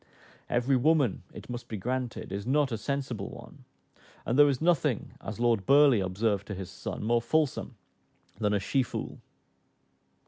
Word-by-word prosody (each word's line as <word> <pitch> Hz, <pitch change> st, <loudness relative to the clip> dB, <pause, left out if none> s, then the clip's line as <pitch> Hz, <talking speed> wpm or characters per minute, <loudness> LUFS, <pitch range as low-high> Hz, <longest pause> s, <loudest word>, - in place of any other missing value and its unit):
Every 125 Hz, +3 st, +2 dB
woman, 140 Hz, -, +2 dB
it -, -, -11 dB
must 120 Hz, -1 st, -6 dB
be 110 Hz, -, -5 dB
granted, 125 Hz, 0 st, -3 dB
is 100 Hz, +3 st, -4 dB
not 140 Hz, 0 st, +2 dB
a 115 Hz, -, -1 dB
sensible 130 Hz, -5 st, -3 dB
one; -, -, -12 dB, 0.6 s
and 120 Hz, -, 0 dB
"there 145 Hz, +1 st, +7 dB
is 135 Hz, -, 0 dB
nothing," 170 Hz, -2 st, +1 dB
as 110 Hz, -, -6 dB
Lord 115 Hz, -5 st, +1 dB
Burleigh 140 Hz, -7 st, +6 dB
observed 100 Hz, +2 st, -1 dB
to 100 Hz, -, -4 dB
his 95 Hz, -1 st, -7 dB
son, 90 Hz, -, -6 dB
"more 115 Hz, +2 st, +2 dB
fulsome 135 Hz, 0 st, 0 dB, 0.6 s
than 105 Hz, -2 st, +1 dB
a -, -, +2 dB
she 130 Hz, +8 st, +1 dB
foole." 125 Hz, -, -5 dB
120 Hz, 165 wpm, -29 LUFS, 105-140 Hz, 0.6 s, there